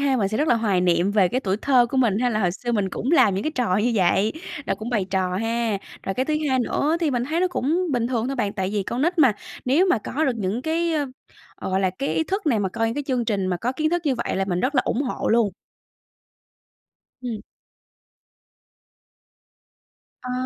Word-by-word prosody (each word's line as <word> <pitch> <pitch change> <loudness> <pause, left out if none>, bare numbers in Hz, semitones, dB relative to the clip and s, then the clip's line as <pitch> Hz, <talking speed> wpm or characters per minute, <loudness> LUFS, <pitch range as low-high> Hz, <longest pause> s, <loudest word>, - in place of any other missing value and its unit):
ha, 270 -2 +2
mình 200 -4 +1
sẽ 215 - -2
rất 305 - +1
là - - +5
hoài 205 -5 +1
niệm 175 +2 +2
về 200 -3 +3
cái 255 - -1
tuổi 195 -4 -1
thơ 255 -3 +4
của 265 - -4
mình 230 -6 +3
ha, 250 - +2
là 215 - 0
hồi 180 -3 +2
xưa 240 +5 -4
mình 205 -4 +1
cũng 255 +9 -3
làm 210 - +5
những 195 - -2
cái 310 - -1
trò 230 -8 +1
như 230 +4 +1
vậy, 195 +2 +2 0.3
là - - +1
cũng 225 +2 -6
bày 215 -6 +1
trò 185 -1 0
ha. 225 -1 -1 0.2
Rồi 195 - -3
cái 260 - 0
thứ 310 - -1
hai 260 - +2
nữa 290 +5 +1
thì 320 -4 +1
mình 245 -1 0
thấy 320 +5 -1
nó 370 - +3
cũng 350 +3 0
bình 240 -2 +1
thường 240 -2 -1
thôi 275 +1 -3
bạn, 205 -4 -1
tại 190 0 -2
vì 205 -2 0
con 240 +6 -3
nít 345 +2 0
mà, 265 -7 +6 0.3
nếu 300 +9 +3
mà 240 - +3
có 300 +8 -2
được 255 -4 0
những 210 +4 -2
cái, 330 +1 0 0.6
ơ, - - -6
gọi 190 +1 +1
là, 190 - +2
cái 275 - -1
ý 320 - +1
thức 390 +1 -3
này, 245 -7 +3
mà 195 -2 0
coi 225 +3 -1
những 225 - -3
cái 290 0 -3
chương 250 -3 0
trình 200 -4 -1
mà 180 -1 0
có 240 +8 -2
kiến 310 +4 0
thức 350 0 0
như 275 - +2
vậy 235 - -2
là 195 - +1
mình 180 -2 -1
rất 280 +3 0
là 255 - +4
ủng 265 - 0
hộ 260 - -2
luôn. 225 -3 +3 1.7
Ừm. 230 -4 -4 2.8
Ờ. 250 - -5
235 Hz, 245 wpm, -23 LUFS, 200-275 Hz, 2.8 s, mà